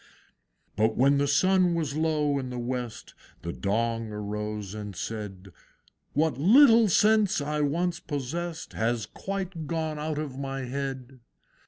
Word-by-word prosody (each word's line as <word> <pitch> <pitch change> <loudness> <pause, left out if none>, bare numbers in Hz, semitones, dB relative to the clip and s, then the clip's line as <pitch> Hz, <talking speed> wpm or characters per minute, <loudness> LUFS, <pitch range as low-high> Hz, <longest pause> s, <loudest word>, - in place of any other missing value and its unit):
But 110 +1 +1
when 140 +2 +4
the 145 - +2
sun 180 +4 +3
was 155 -4 -2
low 150 -3 +1
in 130 -1 -5
the 125 - -5
West, 120 -1 -4 0.3
The 85 0 -4
Dong 115 +2 -1
arose 105 -1 -4
and 105 -2 -6
said, 95 -1 -6 0.6
"What 150 -3 +1
little 230 - +7
sense 210 +1 +4
I 150 +1 -1
once 170 +5 0
possessed 165 +4 -4
Has 115 -1 0
quite 190 - -5
gone 160 -2 -2
out 155 0 -3
of 140 -3 -4
my 135 -1 -3
head!" 135 0 -5
140 Hz, 140 wpm, -27 LUFS, 115-160 Hz, 0.6 s, little